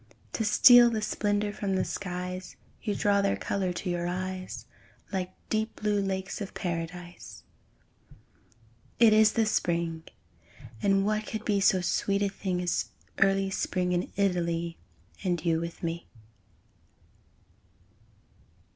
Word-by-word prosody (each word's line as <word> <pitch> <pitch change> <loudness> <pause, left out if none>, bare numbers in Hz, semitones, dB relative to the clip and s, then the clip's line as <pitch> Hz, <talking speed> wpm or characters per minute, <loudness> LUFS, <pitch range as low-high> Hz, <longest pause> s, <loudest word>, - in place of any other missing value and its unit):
To 225 - -1
steal 240 +3 +8
the 220 -2 -2
splendour 205 0 0
from 195 -2 -2
the 185 - +1
skies, 180 -1 -5 0.3
You 210 -3 -2
draw 200 -1 +2
their 200 0 +1
colour 190 -2 -1
to 185 - -5
your 175 -1 -1
eyes, 185 +1 -4 0.5
Like 185 -1 -1 0.2
deep 220 +1 -1
blue 210 -1 0
lakes 190 +1 -3
of 200 - -6
Paradise. 175 0 -5 1.5
It 225 -2 +6
is 215 0 +5
the 225 -1 +2
Spring! 170 -5 0 0.8
And 195 0 +3
what 215 +1 0
could 220 0 -5
be 205 -2 +2
So 190 -1 +4
sweet 200 +3 0
a 200 - +1
thing 185 -2 -3
As 175 - -1 0.3
early 195 0 +3
Spring 180 -1 -1
In 175 0 -1
Italy, 170 -3 0 0.4
And 175 -3 -1
you 165 -1 +2
with 170 +1 -6
me! 170 0 -3
190 Hz, 130 wpm, -28 LUFS, 180-205 Hz, 1.5 s, steal